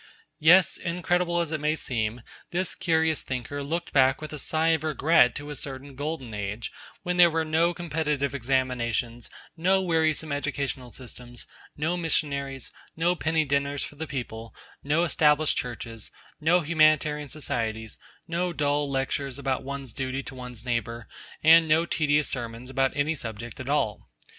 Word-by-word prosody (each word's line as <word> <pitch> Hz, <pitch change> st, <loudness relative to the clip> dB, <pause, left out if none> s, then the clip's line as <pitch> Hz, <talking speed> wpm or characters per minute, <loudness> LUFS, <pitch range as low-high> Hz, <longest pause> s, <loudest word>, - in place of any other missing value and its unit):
Yes; 170 Hz, +4 st, +6 dB
incredible 175 Hz, 0 st, 0 dB
as 165 Hz, -2 st, -3 dB
it 155 Hz, -, -1 dB
may 150 Hz, +1 st, +1 dB
seem, 115 Hz, -5 st, -2 dB, 0.3 s
this 185 Hz, +1 st, -1 dB
curious 160 Hz, -3 st, +1 dB
thinker 130 Hz, +2 st, -4 dB
looked 170 Hz, +4 st, -3 dB
back 130 Hz, -1 st, +4 dB
with 155 Hz, 0 st, -7 dB
a 150 Hz, -, -4 dB
sigh 160 Hz, +3 st, +1 dB
of 160 Hz, -2 st, +2 dB
regret 155 Hz, -4 st, +4 dB
to 145 Hz, +1 st, -6 dB
a -, -, -5 dB
certain 135 Hz, +1 st, -7 dB
Golden 145 Hz, -4 st, -4 dB
Age 105 Hz, +2 st, -4 dB, 0.3 s
when 180 Hz, 0 st, -1 dB
there 175 Hz, -1 st, +8 dB
were 160 Hz, 0 st, 0 dB
no 160 Hz, +2 st, +2 dB
competitive 155 Hz, -5 st, -1 dB
examinations, 120 Hz, -3 st, -1 dB, 0.3 s
no 185 Hz, +3 st, +3 dB
wearisome 160 Hz, -4 st, +1 dB
educational 140 Hz, -2 st, -3 dB
systems, 120 Hz, 0 st, -10 dB, 0.3 s
no 160 Hz, +4 st, 0 dB
missionaries, 140 Hz, -5 st, -1 dB, 0.2 s
no 170 Hz, +2 st, +2 dB
penny 160 Hz, -2 st, +1 dB
dinners 140 Hz, 0 st, 0 dB
for -, -, -8 dB
the 160 Hz, +2 st, -5 dB
people, 115 Hz, -5 st, -6 dB, 0.3 s
no 150 Hz, +4 st, +2 dB
Established 150 Hz, -2 st, +3 dB
Churches, 115 Hz, -3 st, -5 dB, 0.3 s
no 170 Hz, +4 st, +4 dB
Humanitarian 155 Hz, -2 st, +3 dB
Societies, 115 Hz, -7 st, -3 dB, 0.3 s
no 175 Hz, +2 st, -1 dB
dull 145 Hz, -1 st, 0 dB
lectures 135 Hz, 0 st, -2 dB
about 135 Hz, -2 st, -1 dB
one's 140 Hz, -2 st, -6 dB
duty 135 Hz, 0 st, -3 dB
to -, -, -8 dB
one's 125 Hz, -2 st, -9 dB
neighbour, 115 Hz, -1 st, -2 dB, 0.4 s
and 165 Hz, +1 st, +7 dB
no 160 Hz, +2 st, +4 dB
tedious 150 Hz, -3 st, +1 dB
sermons 120 Hz, 0 st, -5 dB
about 135 Hz, 0 st, +2 dB
any 145 Hz, +3 st, +2 dB
subject 120 Hz, -4 st, -7 dB
at 130 Hz, +1 st, -6 dB
all. 140 Hz, -8 st, 0 dB
145 Hz, 155 wpm, -27 LUFS, 130-160 Hz, 0.4 s, there